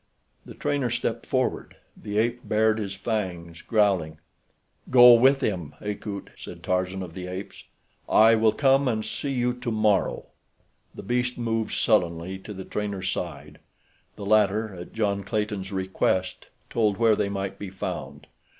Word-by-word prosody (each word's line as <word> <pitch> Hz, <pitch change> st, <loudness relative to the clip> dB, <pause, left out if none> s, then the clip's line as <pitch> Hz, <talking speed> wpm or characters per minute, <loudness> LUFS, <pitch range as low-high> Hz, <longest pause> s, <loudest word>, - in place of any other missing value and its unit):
The -, -, -10 dB
trainer 140 Hz, -4 st, -1 dB
stepped 115 Hz, 0 st, -2 dB
forward. 130 Hz, -1 st, -1 dB, 0.2 s
The 105 Hz, 0 st, -5 dB
ape 120 Hz, +2 st, +1 dB
bared 110 Hz, 0 st, +2 dB
his 100 Hz, -2 st, -4 dB
fangs, 90 Hz, -6 st, -4 dB
growling. 95 Hz, -8 st, +1 dB, 0.7 s
"Go 125 Hz, -1 st, +9 dB
with 135 Hz, +3 st, +5 dB
him, 90 Hz, -, -2 dB
Akut," 105 Hz, -1 st, -6 dB
said -, -, -10 dB
Tarzan 90 Hz, +1 st, -1 dB
of 85 Hz, -3 st, -9 dB
the 90 Hz, 0 st, -6 dB
Apes. 95 Hz, +2 st, -7 dB, 0.4 s
"I 110 Hz, +1 st, +6 dB
will 110 Hz, -1 st, +4 dB
come 135 Hz, +1 st, +3 dB
and 110 Hz, -3 st, -1 dB
see 140 Hz, -, -4 dB
you 125 Hz, -2 st, 0 dB
tomorrow." 110 Hz, -5 st, 0 dB, 0.7 s
The -, -, -8 dB
beast 125 Hz, +3 st, -1 dB
moved 115 Hz, -2 st, -1 dB
sullenly 90 Hz, -3 st, +1 dB
to 100 Hz, -, -10 dB
the 95 Hz, 0 st, -7 dB
trainer's 100 Hz, -2 st, -3 dB
side. 75 Hz, -3 st, -6 dB, 0.6 s
The 100 Hz, -, -7 dB
latter, 105 Hz, 0 st, +2 dB
at 90 Hz, -1 st, -9 dB
John 100 Hz, -3 st, -1 dB
Clayton's 105 Hz, -1 st, -3 dB
request, 95 Hz, -1 st, -1 dB, 0.2 s
told 105 Hz, -4 st, +1 dB
where 115 Hz, -2 st, +4 dB
they 100 Hz, -, -1 dB
might 100 Hz, -1 st, -4 dB
be 100 Hz, -, -6 dB
found. 95 Hz, -, -6 dB
105 Hz, 150 wpm, -25 LUFS, 95-115 Hz, 0.7 s, Go